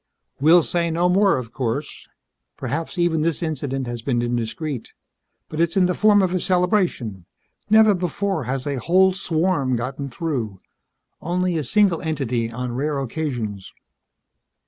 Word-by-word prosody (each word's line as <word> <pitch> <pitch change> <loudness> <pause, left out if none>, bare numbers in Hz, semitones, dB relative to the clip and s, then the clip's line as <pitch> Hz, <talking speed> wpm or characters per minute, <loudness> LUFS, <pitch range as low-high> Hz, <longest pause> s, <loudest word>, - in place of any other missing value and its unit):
"We'll 160 +4 +6
say 170 +1 0
no 170 +2 +1
more, 195 0 +3
of 120 -2 -7
course. 130 +3 -4 0.5
Perhaps 155 +8 -4
even 170 -2 +2
this 165 0 0
incident 140 -4 -2
has 120 -1 -4
been 120 -1 0
indiscreet. 120 +3 -3 0.5
But 155 - -3
it's 170 +3 +1
in 185 - +5
the 180 - +1
form 205 0 +4
of 185 -1 0
a 185 - +1
celebration. 180 - 0 0.4
Never 220 0 +6
before 185 -2 -2
has 130 +1 -3
a 140 -3 -2
whole 185 +8 +4
swarm 165 -7 0
gotten 135 +4 -4
through. 120 - -3 0.6
Only 180 +1 -1
a 155 - -1
single 195 - +3
entity 130 -8 -1
on 125 +1 -4
rare 145 +3 -1
occasions." 120 -8 -4
155 Hz, 145 wpm, -22 LUFS, 125-180 Hz, 0.6 s, We'll